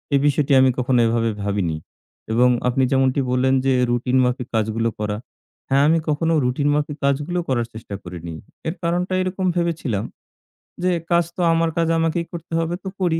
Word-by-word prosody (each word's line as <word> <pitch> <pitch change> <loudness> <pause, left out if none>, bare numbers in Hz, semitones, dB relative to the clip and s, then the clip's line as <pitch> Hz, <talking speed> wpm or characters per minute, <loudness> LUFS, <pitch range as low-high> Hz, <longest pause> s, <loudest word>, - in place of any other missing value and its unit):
এ - - +6
বিষয়টি 145 0 +2
আমি 130 0 +5
কখনো 125 0 +2
এভাবে 115 0 +1
ভাবিনি। 100 -6 -1 0.6
এবং 125 +2 +5 0.2
আপনি 125 +2 +2
যেমনটি 135 0 +2
বললেন 130 +1 +2
যে, 135 - +3 0.2
"রুটিন 125 +2 +1
মাফিক 125 0 -1
কাজগুলো 110 +1 0
করা।" 105 -1 -2 0.5
হ্যাঁ, 135 +1 +4
আমি 165 +1 +4
কখনো 165 +2 +1
রুটিন 135 +4 +1
মাফিক 150 0 -2
কাজগুলো 145 +6 0
করার 120 -3 0
চেষ্টা 110 -2 -7
করিনি। 85 -2 -7 0.3
এর 160 - -2
কারণটা 175 +2 0
এরকম 185 +1 -2
ভেবেছিলাম 160 - -1 0.8
যে, 185 - +3 0.2
"কাজ 170 0 +4
তো - - -3
আমার 165 0 +2
কাজ 165 -1 +2
আমাকেই 165 +1 0
করতে 170 -1 -8
হবে, 165 +1 -1
তো - - -6
করি। 165 -3 +2
135 Hz, 175 wpm, -21 LUFS, 120-165 Hz, 0.8 s, এ